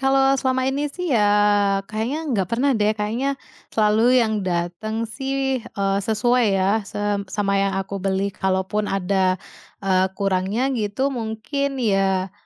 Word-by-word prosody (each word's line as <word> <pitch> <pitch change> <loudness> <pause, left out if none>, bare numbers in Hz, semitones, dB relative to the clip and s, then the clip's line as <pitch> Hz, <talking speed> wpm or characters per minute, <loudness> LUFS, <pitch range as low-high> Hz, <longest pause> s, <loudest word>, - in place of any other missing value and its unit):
kalau 270 0 +3
selama 260 -1 +1
ini 280 +2 0
sih 355 +1 -3
ya, 210 -4 +4 0.6
kayaknya 220 +8 -3
nggak 195 -5 0
pernah 260 +6 +1
deh, 215 -2 +1
kayaknya, 235 +7 -1 0.3
selalu 220 +3 +3
yang 220 -3 +2
dateng 185 +5 -2
sih, 270 +3 -2
eee, 195 -3 -1
sesuai 235 +4 +2
ya 195 +4 +2
sem 205 -1 -2
sama 200 -1 0
yang 195 -1 0
aku 195 +1 -4
beli. 195 +1 -1
Kalaupun 190 +3 -1
ada, 190 -1 +1 0.5
eee, 190 -1 +3
kurangnya 200 +7 0
gitu, 240 +4 -1
mungkin 255 +4 -3
ya 195 -5 +1
215 Hz, 140 wpm, -22 LUFS, 195-255 Hz, 0.6 s, ya